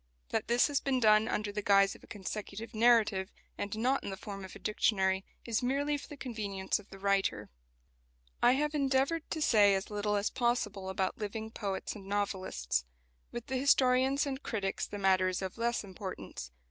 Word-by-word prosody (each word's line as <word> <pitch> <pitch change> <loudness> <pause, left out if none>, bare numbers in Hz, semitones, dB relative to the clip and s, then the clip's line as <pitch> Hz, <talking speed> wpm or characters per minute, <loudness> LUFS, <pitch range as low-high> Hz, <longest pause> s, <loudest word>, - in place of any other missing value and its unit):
That - - -1
this 240 +1 +4
has 285 -3 +1
been 265 -2 0
done 215 -1 +5
under 210 -3 -1
the 210 +1 -3
guise 195 -1 +4
of - - -16
a - - -15
consecutive 210 +2 -6
narrative, 215 -4 +4 0.3
and 205 +1 -4
not 255 +5 +1
in - - -4
the 195 - -5
form 195 0 -7
of 190 - -9
a - - -7
dictionary, 190 -3 +1 0.2
is 230 -2 0
merely 280 +4 +1
for 285 - -7
the 295 - -10
convenience 210 -8 -2
of 210 - -16
the 195 - -10
writer. 195 - 0 0.9
I 245 - +6
have 300 +3 0
endeavoured 280 +3 +1
to 315 -2 -1
say 205 -6 +5
as 195 +2 -3
little 210 0 0
as 205 0 0
possible 210 -6 -1
about 190 0 -1
living 220 +1 -4
poets 200 -3 -4
and 195 -2 -10
novelists. 190 - -1 0.5
With 240 -1 -6
the 265 - -2
historians 265 +1 +3
and 275 -1 -4
critics 200 -7 -2
the 205 - -6
matter 190 -1 +3
is 185 +1 -1
of 190 +4 -5
less 235 0 0
importance. 190 - -7
210 Hz, 190 wpm, -32 LUFS, 195-245 Hz, 0.9 s, I